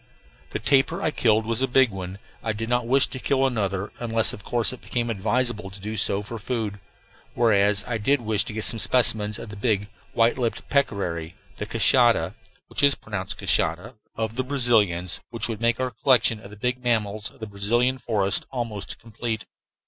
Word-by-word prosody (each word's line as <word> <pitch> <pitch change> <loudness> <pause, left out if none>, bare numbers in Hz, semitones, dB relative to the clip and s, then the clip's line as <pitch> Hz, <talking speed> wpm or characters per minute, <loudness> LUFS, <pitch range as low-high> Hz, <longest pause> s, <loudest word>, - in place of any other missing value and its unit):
The - - -3
tapir 135 -2 +2
I 155 - 0
killed 110 -5 +2
was 115 +2 0
a 135 - +2
big 130 -2 +4
one. 95 0 -6 0.2
I 110 - -1
did 115 +2 -4
not 120 -1 +1
wish 135 +2 +4
to 130 - -8
kill 135 +1 +1
another, 100 -6 -1
unless, 115 -2 +1
of 100 - -9
course, 120 +3 0
it 130 - -11
became 120 -1 -2
advisable 110 0 -1
to 95 +1 -12
do 105 +3 -5
so 100 -1 +3
for 115 +2 -7
food; 110 -3 -3 0.6
whereas 105 -3 +3
I 115 -2 -2
did 140 +7 +2
wish 110 -4 +1
to - - -6
get 110 0 -3
some 115 - +2
specimens 105 -3 +3
of - - -8
the 105 - -8
big, 100 -1 0 0.2
white 115 +3 +2
lipped 120 -2 -2
peccary, 90 - -1 0.2
the - - -4
"queixa" - - +3 0.7
(pronounced 100 -3 -4
"cashada") 90 +10 0 0.2
of 110 +1 -3
the 130 - +1
Brazilians, 110 -10 +1
which 115 -2 -2
would 115 -2 -5
make 115 0 +2
our 130 -1 -1
collection 120 -1 +3
of 105 - -12
the 105 - -12
big 125 +4 -2
mammals 110 -3 0
of - - -22
the 110 - -5
Brazilian 120 +6 0
forests 100 -5 0
almost 115 -6 -4
complete. 115 0 -5
110 Hz, 185 wpm, -24 LUFS, 105-120 Hz, 0.7 s, big